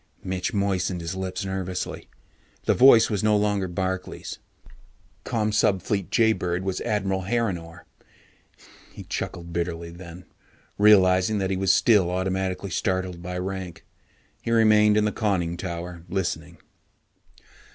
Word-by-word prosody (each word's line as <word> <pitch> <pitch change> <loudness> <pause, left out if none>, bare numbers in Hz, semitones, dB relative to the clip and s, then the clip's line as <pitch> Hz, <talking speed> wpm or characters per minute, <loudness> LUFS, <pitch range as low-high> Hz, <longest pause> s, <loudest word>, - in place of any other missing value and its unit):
Mitch 95 +5 -2
moistened 95 -3 -1
his 85 +2 -5
lips 95 0 -4
nervously. 95 -1 -4 0.6
The - - +3
voice 125 -4 +6
was 105 -2 -1
no 105 -1 +4
longer 105 -2 0
Barkley's. 95 +1 -4 0.9
Commsubfleet 105 -3 0
Jaybird 95 -6 +1
was 95 -1 -2
Admiral 95 -2 -1
Harrinore. 95 -7 -2 1.1
He - - -10
chuckled 85 -1 -5
bitterly 85 -1 -3
then, 85 0 -11 0.5
realizing 95 -1 +5
that 95 -1 -1
he - - +1
was 95 0 +2
still 100 -4 +4
automatically 95 +1 -2
startled 95 -2 -2
by 90 +1 -5
rank. 95 -1 -5 0.6
He - - -5
remained 110 -2 +5
in 105 - +3
the 105 - +1
conning 95 -7 -1
tower, 85 -1 -6
listening. 85 -2 -3
95 Hz, 120 wpm, -25 LUFS, 90-105 Hz, 1.1 s, voice